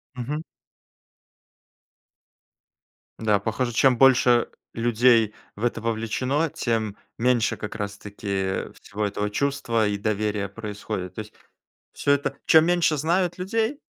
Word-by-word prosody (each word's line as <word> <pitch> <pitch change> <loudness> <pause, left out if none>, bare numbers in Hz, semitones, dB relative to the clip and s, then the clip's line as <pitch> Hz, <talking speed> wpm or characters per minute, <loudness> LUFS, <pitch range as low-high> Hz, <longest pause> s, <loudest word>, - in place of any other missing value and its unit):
Мгм. 140 +5 -3 2.8
Да, 105 -2 +2
похоже, 115 +4 -2
чем 130 +1 +4
больше 125 -2 +5 0.3
людей 115 -1 +3 0.2
в 105 - -8
это 115 -1 -1
вовлечено, 115 +7 -1
тем 110 -6 -2 0.2
меньше 120 -1 +2
как 105 - -6
раз-таки 100 -1 -3
всего 105 +1 -3
этого 105 +1 -2
чувства 115 -2 0
и 105 0 -1
доверия 105 -1 -1
происходит. 105 -2 -6
То - - -6
есть 105 0 -12 0.6
всё 140 - +1
это 145 0 0
чем 160 -1 +7
меньше 175 -3 +2
знают 175 +4 +1
людей, 225 +9 -1
115 Hz, 115 wpm, -24 LUFS, 105-135 Hz, 2.8 s, чем